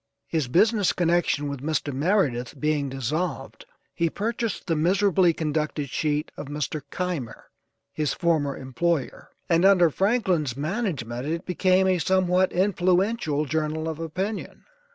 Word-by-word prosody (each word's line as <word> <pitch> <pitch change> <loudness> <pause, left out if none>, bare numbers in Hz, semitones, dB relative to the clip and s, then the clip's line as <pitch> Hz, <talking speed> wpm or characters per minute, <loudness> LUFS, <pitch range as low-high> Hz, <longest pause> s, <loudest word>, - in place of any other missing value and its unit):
His 155 -6 -1
business 205 - +3
connection 170 -4 +1
with 140 -2 -5
Mr. 150 -1 -1
Meridith 140 - 0
being 150 -1 0
dissolved, 150 +7 -3 0.3
he 170 -1 0
purchased 225 +3 -3
the 165 - 0
miserably 180 +2 +3
conducted 150 -3 -2
sheet 150 0 -1
of 145 - -7
Mr. 150 +1 -3
Keimer, 170 -11 -4 0.4
his 150 -2 -1
former 155 -6 0
employer, 135 +3 -2 0.2
and 170 -1 +3
under 185 -4 +5
Franklin's 185 - +1
management 145 - -3
it 165 +3 -3
became 185 +1 +2
a 185 -1 +2
somewhat 185 +1 +2
influential 185 -3 +1
journal 155 +2 -2
of 160 -1 -4
opinion. 185 +6 -4
165 Hz, 130 wpm, -25 LUFS, 145-185 Hz, 0.4 s, under